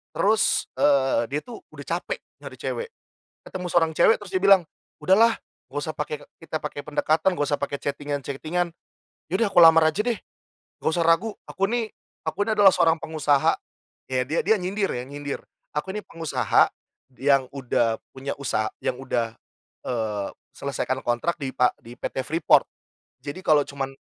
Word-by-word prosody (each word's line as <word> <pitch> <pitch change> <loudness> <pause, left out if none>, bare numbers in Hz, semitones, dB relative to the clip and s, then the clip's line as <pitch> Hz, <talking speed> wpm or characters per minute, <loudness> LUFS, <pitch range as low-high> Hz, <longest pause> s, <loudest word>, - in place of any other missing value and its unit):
terus 215 +1 +2
eee, 135 -4 +3
dia 145 +4 -2
tuh 240 - -9 0.2
udah - - -9
capek - - -5 0.2
nyari - - -9
cewek. 475 -1 -4 0.5
Ketemu 180 -1 -6
seorang 165 -2 +2
cewek 160 - +5
terus 205 -3 -11
dia 185 - +1
bilang, 195 -2 +7 0.4
udahlah, 220 +7 +5 0.3
enggak - - -4
usah 155 - -2
pake 150 0 -3
ka - - -15
kita 160 -1 -4
pakai 150 -1 -4
pendekatan, 155 +3 +2
enggak 145 -3 0
usah 145 - +1
pake 140 0 -2
chatting-an-chatting-an. 145 +4 -2 0.6
Yaudah 205 +3 +2
aku 180 - +3
lamar 165 -1 +8
aja 155 - -3
deh, 240 -2 0 0.7
enggak - - +2
usah - - +3
ragu. 165 +7 +3 0.2
Aku 195 - 0
ini 235 -1 0 0.4
aku 205 - -1
ini 220 - +1
adalah 200 -1 +9
seorang 165 0 +3
pengusaha. 155 -3 +2 0.5
Ya, 130 -1 0
dia 155 +4 -1
dia 220 - +6
nyindir 195 +3 -1
ya, 125 - -3
nyindir. 145 0 -5 0.3
Aku 150 +6 -2
ini 210 - -3
pengusaha, 165 -2 +2 0.5
yang 135 -1 +3
udah 120 -4 0 0.2
punya 135 +1 -4
usa 120 -6 0 0.2
yang - - 0
udah 120 -4 -2 0.5
eee, 110 -5 -2 0.3
selesaikan 130 -1 -2
kontrak 120 +8 +1
di 135 -3 -3
pa 125 - +4
di 120 +1 -11
PT 130 - -3
Freeport. 160 +2 +4 0.5
Jadi, 145 +6 -7
kalau 150 -3 +5
cuman 135 -1 -4
150 Hz, 165 wpm, -25 LUFS, 135-185 Hz, 0.7 s, adalah